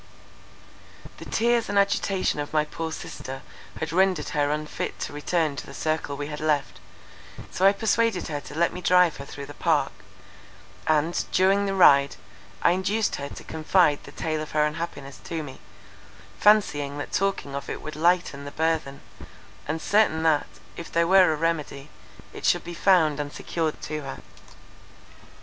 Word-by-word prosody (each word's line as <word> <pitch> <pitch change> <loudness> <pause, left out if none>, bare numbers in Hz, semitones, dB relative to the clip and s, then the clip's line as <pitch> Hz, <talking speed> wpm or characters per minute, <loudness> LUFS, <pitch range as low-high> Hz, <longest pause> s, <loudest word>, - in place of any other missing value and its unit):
The - - -9
tears 235 -1 +1
and 205 - 0
agitation 195 -4 +1
of 145 - -4
my 155 -1 +2
poor 160 +1 -5
sister 135 -3 -7 0.4
had 160 -1 -3
rendered 185 -2 +2
her 145 -1 0
unfit 150 0 -3
to - - -4
return 155 0 0
to - - -6
the - - -10
circle 155 -2 -2
we 145 - -4
had 150 0 -6
left—so 155 +4 -3
I - - +7
persuaded 220 -1 0
her 145 -2 -4
to 145 - -11
let 170 +2 +1
me 180 - -6
drive 180 -2 +4
her 140 - -8
through 140 0 -8
the - - -10
park; - - +1 1.0
and, 155 +2 +2
during 195 +2 +3
the 195 - -1
ride, 140 -6 +6 0.5
I - - +5
induced 195 +4 0
her 140 0 -5
to - - -10
confide 160 -1 +2
the - - -11
tale 155 -1 -3
of 155 - -7
her 150 0 +3
unhappiness 150 -3 -5
to 165 -2 -4
me, 135 -2 -10 0.8
fancying 145 -10 +3
that 145 - -6
talking 195 -8 -1
of 140 0 -5
it - - -5
would 155 - -6
lighten 170 -3 +1
the - - -5
burthen, 160 -3 -1 0.7
and 160 +2 -2
certain 200 -5 +2
that, 155 -2 +2 0.3
if 170 - -8
there 170 0 +2
were 185 -1 +6
a - - 0
remedy, 150 -3 -2 0.4
it - - -9
should - - +2
be 175 - -7
found 165 -5 +3
and 145 0 -3
secured 160 -1 -3
to 155 0 -4
her. 135 -1 -7
160 Hz, 170 wpm, -25 LUFS, 145-180 Hz, 1.0 s, I